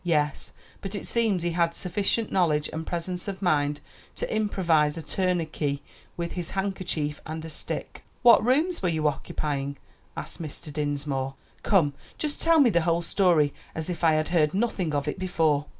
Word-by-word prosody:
"Yes; 150 -5 0 0.3
but 195 +1 -5
it 200 - -4
seems 220 -7 +1
he 175 - 0
had 170 0 +1
sufficient 200 +4 -1
knowledge 155 -5 +2
and 160 0 -4
presence 175 +2 -3
of 195 -1 -5
mind 145 -4 +2 0.3
to - - -2
improvise 170 -8 +2
a 165 - -5
tourniquet 160 -7 -1 0.4
with 170 -1 -3
his 175 -2 -2
handkerchief 185 -6 -2
and 160 +1 -6
a 160 - -7
stick." - - -5 0.2
"What 235 -3 +8
rooms 305 +9 +2
were 180 - +2
you 155 -2 +1
occupying?" 140 0 -2 0.4
asked - - -5
Mr. 150 -1 -7
Dinsmore. 140 -2 -2 0.3
"Come, 165 -8 +3 0.2
just 300 -1 -3
tell 330 -1 +5
me 260 -6 +6
the 170 -2 +3
whole 170 +1 +1
story 170 -5 +3 0.2
as 160 +2 -3
if 175 - -6
I 160 -1 +6
had 155 0 +1
heard 160 -2 +2
nothing 190 -8 0
of 145 0 -1
it 150 - -2
before." 160 -6 +1
170 Hz, 175 wpm, -27 LUFS, 150-190 Hz, 0.4 s, What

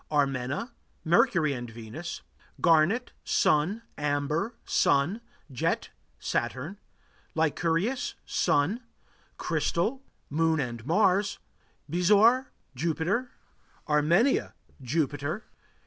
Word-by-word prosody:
Armena 140 - 0 0.3
Mercury 170 - +3
and 120 -2 -5
Venus. 115 +9 -7 0.4
Garnet 170 +9 +3
Sun. 180 +10 +2 0.2
Amber 150 - -1
Sun. 160 +11 +2 0.3
Jet 125 - -1 0.3
Saturn. 130 +11 -3 0.6
Lyncurius 165 - 0
Sun. 180 - +1 0.6
Crystal 170 - 0 0.3
Moon 160 +1 +1
and 120 -4 -3
Mars. 200 +3 +3 0.5
Bezoar 210 +9 +4 0.2
Jupiter. 170 - -1 0.6
Armenia 160 - +3 0.3
Jupiter. 145 - -2
160 Hz, 75 wpm, -28 LUFS, 145-200 Hz, 0.6 s, Bezoar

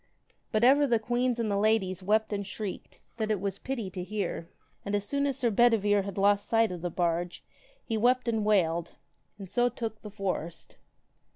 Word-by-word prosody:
But 215 0 +1
ever 280 +3 +6
the 235 -3 +3
queens 240 +2 0
and 220 -3 0
the 200 - +1
ladies 200 -4 +1
wept 215 +3 +1
and 200 0 -2
shrieked, 200 0 -6 0.2
that 220 -2 -1
it 215 -3 +1
was 195 0 -3
pity 235 -8 -4
to 180 0 -5
hear. 185 -3 -4 0.3
And 205 0 -2
as 205 - 0
soon 280 +5 0
as 270 -2 -1
Sir 245 -4 +1
Bedivere 205 -2 +4
had 195 0 -6
lost 200 +1 +3
the - - -11
sight 225 -3 +3
of 175 -2 -6
the 175 - -2
barge, 175 0 -1 0.4
he 225 - -1
wept 250 +2 +3
and 225 -2 +1
wailed, 170 -5 +1 0.4
and 195 -2 -8
so 245 +6 +2
took 225 -2 -5
the 210 - -8
forest. 190 -5 -4
210 Hz, 200 wpm, -29 LUFS, 190-230 Hz, 0.4 s, ever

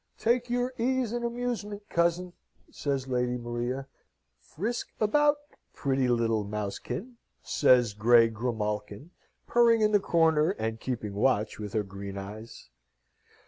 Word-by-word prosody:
"Take 240 +1 +1
your 245 +1 0
ease 255 -1 +1
and 240 0 -2
amusement, 235 -4 -3
cousin," 170 +1 0 0.4
says 135 -2 -2
Lady 125 -1 0
Maria. 120 +2 -3 0.5
"Frisk 215 - -4
about, 295 +7 +3 0.4
pretty 135 -2 0
little 115 -3 +1
mousekin," 105 - -5 0.3
says 125 -6 +4
grey 115 +2 +5
Grimalkin, 110 - -4 0.3
purring 235 -1 +4
in 210 0 +3
the 205 - +5
corner, 160 -4 +3
and 110 0 -3
keeping 110 -5 -4
watch 110 -1 +1
with 105 -2 -6
her 110 - +1
green 100 0 -8
eyes. 105 - -9
130 Hz, 125 wpm, -28 LUFS, -, 0.5 s, grey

